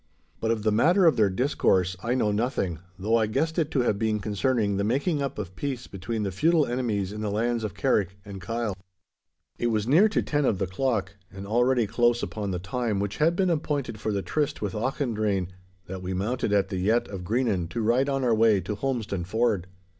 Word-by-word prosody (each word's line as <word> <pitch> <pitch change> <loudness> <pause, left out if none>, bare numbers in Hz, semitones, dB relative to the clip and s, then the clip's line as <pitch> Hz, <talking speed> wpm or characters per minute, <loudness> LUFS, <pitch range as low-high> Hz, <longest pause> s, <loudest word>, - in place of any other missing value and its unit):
But 110 - -1
of 115 -2 0
the 110 - +2
matter 175 - +4
of 165 - +5
their 105 -3 +3
discourse 95 -5 +1
I 120 +4 0
know 110 -5 +1
nothing, 105 - -1 0.2
though 105 +4 +1
I 110 -2 +2
guessed 160 +9 0
it 155 -3 +1
to 135 - +1
have 105 -4 0
been 110 -1 0
concerning 105 0 0
the 100 - 0
making 140 - 0
up 140 - -3
of 95 -3 -6
peace 130 -4 -4
between 105 +3 -4
the 100 - -2
feudal 155 - +3
enemies 110 -6 -1
in 105 - -5
the 105 - -1
lands 115 +2 0
of 105 - -4
Carrick 100 -8 +1
and 100 -2 -8
Kyle. 115 +1 -2 0.8
It 120 - +1
was 110 -2 0
near 175 - +5
to 210 - 0
ten 145 -1 0
of 110 -7 +2
the 95 - 0
clock, 105 0 -2
and 95 0 -8
already 120 +3 +2
close 120 +2 +2
upon 105 -2 -3
the 90 - -1
time 110 +2 -2
which 100 +1 -3
had 165 +3 +3
been 185 -1 +2
appointed 145 -8 -2
for 110 - -2
the 100 -2 -1
tryst 145 - -1
with 100 -3 -3
Auchendrayne, 110 - -1 0.4
that 95 0 -7
we 90 0 -3
mounted 110 +4 -1
at 100 -2 +2
the 95 - -3
yett 110 +6 +1
of 95 -3 -7
Greenan 100 -5 0
to 120 - -4
ride 125 +5 +2
on 135 -1 0
our 120 -2 +3
way 110 -2 +4
to 95 +3 -4
Holmestone 110 -6 -2
Ford. 110 -3 0
110 Hz, 220 wpm, -26 LUFS, 100-130 Hz, 0.8 s, of